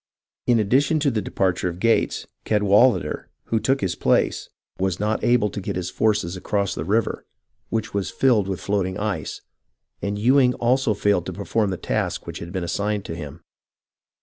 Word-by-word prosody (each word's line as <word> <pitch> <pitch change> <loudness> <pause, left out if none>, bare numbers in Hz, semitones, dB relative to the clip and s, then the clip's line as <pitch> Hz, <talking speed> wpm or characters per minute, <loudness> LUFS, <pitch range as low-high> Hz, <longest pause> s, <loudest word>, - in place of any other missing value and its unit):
In 120 -2 +4
addition 135 +9 +2
to 140 -2 +2
the 110 -3 -1
depar 95 -3 0
ture 90 - -1
of 85 0 -8
Gates, 115 +3 +1 0.2
Cadwalader, 105 +4 +3 0.2
who 115 - 0
took 135 +4 +1
his 95 -3 0
place, - - +1 0.3
was 95 -1 0
not 105 +1 -1
able 120 -4 +3
to 100 - -5
get - - -4
his 90 -1 -3
force 105 -1 +2
across 100 +1 -1
the - - -4
river, 105 +6 0 0.4
which 110 -1 -2
was 100 -1 -1
filled 115 -7 +2
with 95 -2 -3
float 100 -2 0
ing 95 - -5
ice, 100 -7 -3 0.6
and 100 +1 -2
Ewing 125 +3 +4
also 120 -2 +2
failed 100 -4 +1
to - - -4
perform 105 +1 0
the 95 - -2
task - - -2
which - - -6
had 85 - -7
been 95 -1 -3
assigned 100 +3 -1
to 80 - -5
him. 75 0 -8
105 Hz, 185 wpm, -23 LUFS, 95-115 Hz, 0.6 s, In